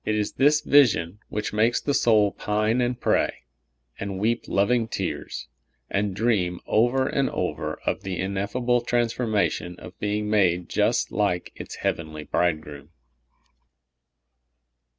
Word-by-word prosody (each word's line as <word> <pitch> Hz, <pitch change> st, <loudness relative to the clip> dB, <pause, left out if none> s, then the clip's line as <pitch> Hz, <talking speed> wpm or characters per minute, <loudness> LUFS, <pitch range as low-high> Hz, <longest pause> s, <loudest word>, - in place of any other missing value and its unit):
It 110 Hz, -, 0 dB
is 105 Hz, -1 st, -1 dB
this 145 Hz, +2 st, +3 dB
vision 110 Hz, -, +3 dB
wdiich 105 Hz, 0 st, -3 dB
makes 110 Hz, +3 st, +2 dB
the 140 Hz, -, -1 dB
soul 105 Hz, -6 st, +4 dB
pine 110 Hz, +4 st, 0 dB
and 120 Hz, 0 st, -1 dB
pray, -, -, 0 dB, 0.6 s
and 100 Hz, -1 st, -4 dB
weep 115 Hz, +4 st, 0 dB
loving 115 Hz, +4 st, +2 dB
tears, 85 Hz, -, -4 dB, 0.4 s
and 100 Hz, -1 st, 0 dB
dream 95 Hz, -5 st, +1 dB
over 120 Hz, +4 st, +2 dB
and 140 Hz, -2 st, 0 dB
over -, -, -3 dB
of -, -, -1 dB
the 95 Hz, -2 st, -4 dB
ineffable 105 Hz, +6 st, 0 dB
trans 120 Hz, -1 st, 0 dB
formation 100 Hz, -7 st, -1 dB
of -, -, -12 dB
being 105 Hz, 0 st, -1 dB
made 90 Hz, -5 st, +2 dB
just -, -, +1 dB
like 100 Hz, -4 st, 0 dB
its -, -, -8 dB
heavenly 80 Hz, -2 st, -3 dB
Bride 80 Hz, +1 st, +1 dB
groom. 75 Hz, -1 st, -11 dB
105 Hz, 135 wpm, -25 LUFS, 95-120 Hz, 0.6 s, soul